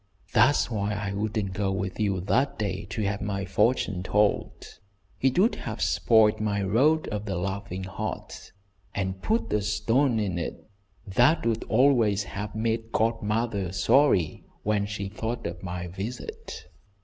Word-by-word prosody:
That's 125 +3 +4
why 105 -1 -1
I 100 0 -3
wouldn't 105 -1 -2
go 95 0 -1
with 95 +1 -3
you 100 -4 0
that 130 +9 +1
day 100 -1 -2
to 105 +3 -3
have 100 0 -1
my 100 -2 -2
fortune 100 -1 +1
told. 105 +2 0 0.4
It 130 +2 +2
would 210 +6 +4
have 110 -1 -5
spoiled 110 -2 +3
my 100 -2 0
'Road 140 +11 +3
of 105 0 -4
the 100 -2 -2
Loving 95 +1 -3
Heart,' 95 -1 -6 0.4
and 95 -1 -2
put 225 +2 0
a 105 - +2
stone 115 +4 +1
in 95 -5 -1
it - - -6 0.4
that 115 - +3
would 115 -1 0
always 115 -7 +3
have 105 +1 -6
made 115 0 -1
godmother 110 -3 0
sorry 95 - +3 0.2
when 105 -1 +1
she 105 -1 -4
thought 110 +4 -4
of 85 +1 -5
my 90 -1 -4
visit. 100 +8 -7
105 Hz, 150 wpm, -27 LUFS, 95-115 Hz, 0.4 s, That's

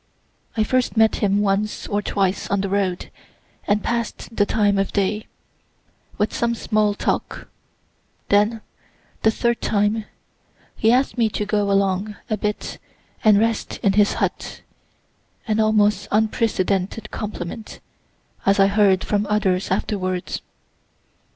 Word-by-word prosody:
I 220 - +3
first 250 +1 0
met 220 0 +4
him 205 -1 +2
once 205 +1 0
or 205 0 0
twice 195 -2 -1
on 200 -1 +1
the 195 - -2
road, 190 -2 -1 0.6
and 205 +1 +1
pass'd 235 -1 -3
the 205 -2 +2
time 205 -2 +2
of 195 - 0
day, 210 +2 -1 0.9
with 210 +1 0
some 235 0 0
small 215 -2 +1
talk; - - -2 0.8
then, 210 +2 +3 0.6
the 220 - +4
third 235 +1 0
time, 210 +1 +1 0.7
he 225 - +3
ask'd 255 0 +1
me 225 -2 +3
to 210 0 -3
go 205 -1 0
along 195 +1 +1 0.2
a - - +3
bit 210 +1 -3 0.4
and 215 -2 +6
rest 225 +1 0
in 195 - +3
his 205 0 +4
hut - - -3 0.9
(an 215 0 +1
almost 210 -2 +2
unprecedented 210 -1 0
compliment, 210 0 -6 0.6
as 200 +1 +3
I 195 - +7
heard 200 -2 +3
from 205 0 0
others 195 -3 +1
afterwards.) 185 -2 -2
210 Hz, 130 wpm, -22 LUFS, 195-220 Hz, 0.9 s, I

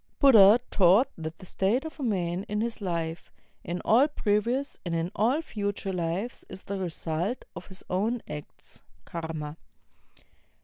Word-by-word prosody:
Buddha 225 -5 +8
taught 195 +6 +5
that 160 0 -6
the - - -12
state 210 - 0
of 320 0 -8
a - - -3
man 185 -5 0
in 210 - -1
this 225 +1 -2
life, 165 -3 -3 0.3
in 175 +2 -3
all 250 +6 +6
previous 240 +1 0
and 170 -2 -2
in 165 +2 -1
aU 245 +9 +2
future 205 -5 -3
lives, 180 +7 -2
is 190 0 -9
the 200 0 -4
result 175 +4 -3
of - - -8
his 190 -1 -10
own 220 +6 0
acts 150 -1 -8 0.2
(karma). 160 -2 -5
195 Hz, 150 wpm, -28 LUFS, 170-230 Hz, 0.3 s, Buddha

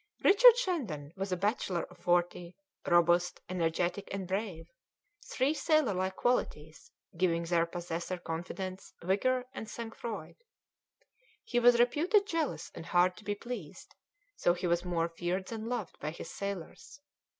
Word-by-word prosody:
Richard 475 +4 +8
Shandon 215 - -2
was 195 0 -4
a 180 - +1
bachelor 195 -3 0
of - - -11
forty, 175 0 0 0.3
robust, 175 +1 +3
energetic, 175 +2 -1
and 195 -2 -4
brave, 190 -4 -3 0.6
three 270 +4 +1
sailor 310 -8 +2
like 190 +1 -1
qualities, 160 -11 -1 0.3
giving 170 -1 +2
their 170 0 +2
possessor 175 +1 -4
confidence, 185 +3 -6
vigour, 250 +8 +1
and 220 - -6
sang 230 -1 -6
froid. 215 -9 -6 1.1
He 345 - 0
was 240 0 +6
reputed 330 - +3
jealous 330 -6 -2
and 165 - -9
hard 180 +1 +3
to - - -13
be 205 0 -2
pleased, 205 -8 -8 0.4
so 175 - +2
he 180 - -4
was 170 0 +2
more 170 -2 0
feared 175 +3 -3
than 225 0 -5
loved 235 -8 -4
by 150 - -3
his 160 - -8
sailors. 200 - -6
185 Hz, 145 wpm, -31 LUFS, 175-235 Hz, 1.1 s, Richard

